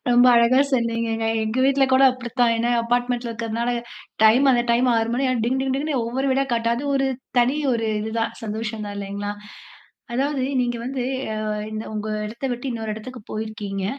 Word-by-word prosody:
ரொம்ப 245 +1 +6
அழகா 235 +3 +5
சொன்னீங்கங்க. 230 -2 0 0.2
எங்க 220 +3 -2
வீட்ல 275 0 +4
கூட 260 - +5
அப்படித்தான். 245 -1 0
ஏன்னா 235 +1 0
அப்பார்ட்மெண்ட்ல 245 0 -1
இருக்கிறதுனால, 230 +1 -2 0.5
டைம் 255 +6 +6
அந்த 240 -1 +3
டைம் 250 +2 +3
6 225 0 +1
மணி 270 +2 0
ஆனா - - +2
டிங், 260 +3 0
டிங், 265 - -1
டிங்ன்னு 285 -2 -1
ஒவ்வொரு 265 +3 -1
வீடா 275 +1 +2
காட்ட 230 0 0
அது 280 - -4
ஒரு 270 0 +1 0.3
தனி 255 +5 +2 0.2
ஒரு 225 -2 0
இது 220 +1 -4
தான், 225 - -1
சந்தோஷம் 220 0 -4
தான், 205 - -6
இல்லைங்களா? 200 +1 -4 0.8
அதாவது, 275 +1 0 0.2
நீங்க 240 -1 -1
வந்து, 260 +1 -3 0.3
அ - - -4 0.3
இந்த 215 +1 -5
உங்க 215 0 -4 0.2
இடத்தை 235 +5 -5
விட்டு 245 +2 -4
இன்னொரு 225 -2 -4
இடத்துக்கு 245 +3 -9
போயிருக்கீங்க. 210 -3 -4
235 Hz, 180 wpm, -23 LUFS, 220-255 Hz, 0.8 s, ரொம்ப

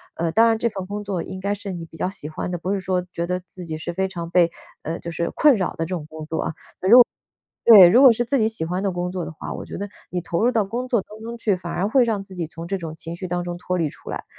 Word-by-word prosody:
呃， 165 0 -1
当 225 +6 +5
然 225 -1 +3
这 235 - 0
份 195 -3 -6
工 205 +2 -5
作 190 -4 -2
应 185 - -7
该 200 +2 -1
是 205 -1 -5
你 170 -2 -6
比 165 - -14
较 180 - -1
喜 155 -6 -5
欢 155 - -4
的， 175 - -2
不 180 +3 -3
是 200 - 0
说 185 -1 -1
觉 170 - -2
得 180 +1 -1
自 180 0 -11
己 160 -1 -4
是 165 +2 -5
非 190 +2 0
常 170 -3 -6
被， 175 -1 +4 0.3
呃， 165 +2 -3
就 170 - -6
是 170 +1 -2
困 295 -4 +6
扰 185 - 0
的 - - -14
这 - - -8
种 160 -4 -6
工 155 0 -8
作 160 +1 -2
啊， - - -3 1.1
如 235 - +9
果 - - +11
对， 180 - +11
如 240 +9 +6
果 260 -3 +9
是 240 +2 -1
自 275 +3 +1
己 220 -2 +3
喜 220 -7 -1
欢 180 +3 -2
的 200 - +1
工 180 0 -3
作 185 -2 -3
的 - - -6
话， 160 - -7
我 - - -6
觉 - - -7
得 205 +2 -4 0.2
你 180 - -2
投 170 +5 -1
入 245 - +5
到 225 -4 +1
工 240 +6 -4
作 235 -5 +2
当 215 +3 -13
中 230 +1 -6
去， 215 -3 +1
反 180 -2 -6
而 195 +3 0
会 255 +4 +4
让 220 -4 0
自 195 - -11
己 175 -3 -3
从 165 +1 -8
这 195 +3 -1
种 160 -3 -7
情 165 +1 -6
绪 185 +1 -6
当 175 0 -2
中 175 0 -4
脱 180 +1 -2
离 165 -3 +1
出 - - -13
来， - - -5
185 Hz, 340 characters per minute, -23 LUFS, 170-210 Hz, 1.1 s, 果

